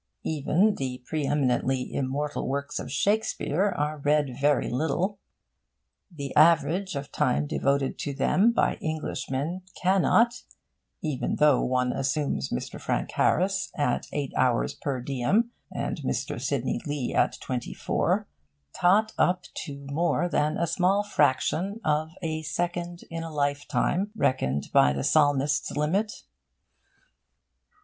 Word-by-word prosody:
Even 160 +7 +2
the 130 -2 -4
pre 155 -3 -2
eminently 130 -2 0
immortal 140 +2 -2
works 140 +2 -2
of 125 - -6
Shakespeare 200 - +1
are 150 +1 -1
read 145 -2 +1
very 145 -1 +3
little. 160 - -1 0.9
The 140 -6 -7
average 170 +4 +4
of 140 0 -5
time 150 -1 +1
devoted 140 -1 0
to 140 -2 -3
them 205 +10 +3
by 235 - +1
Englishmen 155 +1 -3 0.2
cannot 210 +6 +3 0.6
(even 150 -5 -1
though 150 -3 +4
one 125 0 +1
assess 135 - -1
Mr. 60 - -4
Frank - - -1
Harris 190 +3 +1
at 145 -5 0
eight 145 -2 -3
hours 125 -2 +2
per 135 -3 -3
diem, 140 - +1 0.2
and - - -3
Mr. - - -3
Sidney - - -1
Lee 145 -4 -2
at - - +2
twenty 125 -2 -4
four) - - 0 0.5
tot 210 +5 +3
up 180 0 +2
to 140 -1 -7
more 170 +3 +1
than 155 -2 0
a 170 - +1
small 185 +4 +2
fraction 190 +3 +1
of 155 +1 +1
a 160 -1 -2
second 175 +2 -3
in 165 0 -4
a 165 - -5
lifetime 145 +5 0
reckoned 70 - 0
by 70 0 +5
the 70 -1 -3
Psalmist's 145 -1 +2
limit. 195 +10 0
150 Hz, 130 wpm, -27 LUFS, 135-175 Hz, 0.9 s, by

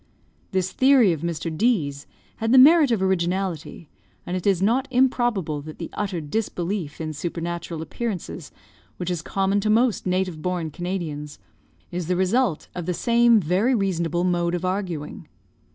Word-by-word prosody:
This 185 -1 -1
theory 260 -8 +5
of 155 - -5
Mr. 165 -1 -3
D 190 -7 +2
's 140 +1 -12 0.3
had 225 +1 -1
the 260 - +6
merit 300 +2 +7
of 220 -5 +1
originality, 180 -3 -1 0.4
and 180 - -3
it 185 +1 -2
is 195 -3 +3
not 235 +8 +1
improbable 240 - +1
that 155 +1 -10
the 165 - -7
utter 195 -4 -2
disbelief 175 0 -3
in 155 -1 -4
supernatural 170 +1 -4
appearances 180 -3 -5 0.5
which 180 0 -3
is 175 -3 -2
common 195 +3 0
to 215 +1 -1
most 230 -1 +2
native 180 -3 -1
born 175 -3 -2
Canadians, 160 -4 -5 0.5
is 175 -2 -4
the 180 - +1
result 190 0 +1
of 175 -2 -6
the 180 - 0
same 235 +1 +4
very 195 +9 +1
reasonable 175 -4 0
mode 175 -1 +1
of 175 +1 -3
arguing. 185 -6 -4
180 Hz, 160 wpm, -23 LUFS, 165-215 Hz, 0.5 s, merit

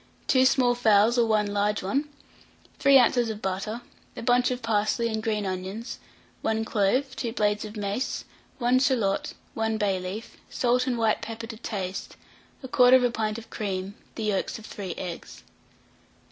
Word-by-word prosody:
2 260 -1 +5
small 250 -2 +3
fowls 225 -1 +4
or 235 -2 +3
1 215 -1 +2
large 205 0 0
one, 275 +10 -1 0.7
3 275 0 +7
oz. 245 0 +4
of 215 -1 -4
butter, 195 +4 -3 0.4
a - - -5
bunch 245 +1 +3
of 250 -1 -3
parsley 225 +1 +1
and 220 -1 -2
green 215 -2 -1
onions, 190 +5 -5 0.4
1 220 0 0
clove, 240 +6 +1
2 235 - -3
blades 210 -1 +1
of 215 +1 -8
mace, 205 +6 -2 0.3
1 250 0 +3
shalot, 235 -7 +1 0.2
1 220 0 -1
bay 200 -3 +1
leaf, 185 +5 -7
salt 250 +1 +1
and 245 -2 0
white 225 -2 +2
pepper 225 0 -6
to 225 0 -8
taste, 195 -4 -5 0.5
1/4 250 -1 +5
pint 215 -1 -1
of 230 - -11
cream, 195 -2 -3 0.2
the 225 - -4
yolks 205 -3 -1
of 220 - -12
3 190 -6 -6
eggs. 175 -2 -7
220 Hz, 160 wpm, -26 LUFS, 205-245 Hz, 0.7 s, 3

